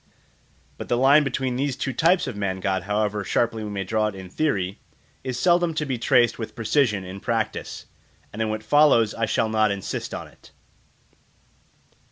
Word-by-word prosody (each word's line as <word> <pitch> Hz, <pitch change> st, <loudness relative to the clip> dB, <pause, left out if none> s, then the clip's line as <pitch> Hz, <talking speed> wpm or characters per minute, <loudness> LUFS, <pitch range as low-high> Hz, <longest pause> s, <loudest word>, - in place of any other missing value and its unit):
But -, -, -7 dB
the 120 Hz, -, +2 dB
line 140 Hz, +4 st, +5 dB
between 130 Hz, -2 st, -2 dB
these 140 Hz, 0 st, -1 dB
two 135 Hz, 0 st, -3 dB
types 175 Hz, +6 st, +3 dB
of -, -, -5 dB
man 100 Hz, -2 st, -2 dB
god, 95 Hz, 0 st, -1 dB
however 105 Hz, 0 st, -1 dB
sharply 115 Hz, +2 st, 0 dB
we 105 Hz, -, -5 dB
may 100 Hz, -1 st, -3 dB
draw 110 Hz, +3 st, 0 dB
it 105 Hz, -, -5 dB
in 95 Hz, -1 st, -10 dB
theory, 100 Hz, -11 st, -1 dB, 0.4 s
is 130 Hz, -2 st, -3 dB
seldom 175 Hz, -2 st, +2 dB
to 155 Hz, -, -1 dB
be 130 Hz, -4 st, -3 dB
traced 120 Hz, -2 st, +3 dB
with 110 Hz, -, -6 dB
precision 115 Hz, -3 st, +1 dB
in 95 Hz, +1 st, -8 dB
practice, 115 Hz, 0 st, -3 dB, 0.5 s
and 110 Hz, -, -5 dB
in 110 Hz, -, 0 dB
what 110 Hz, 0 st, -3 dB
follows 115 Hz, -4 st, +4 dB
I 115 Hz, -1 st, -1 dB
shall 110 Hz, -, +1 dB
not 110 Hz, -1 st, +2 dB
insist 100 Hz, -1 st, -4 dB
on -, -, -6 dB
it. -, -, -20 dB
110 Hz, 185 wpm, -24 LUFS, 105-135 Hz, 0.5 s, line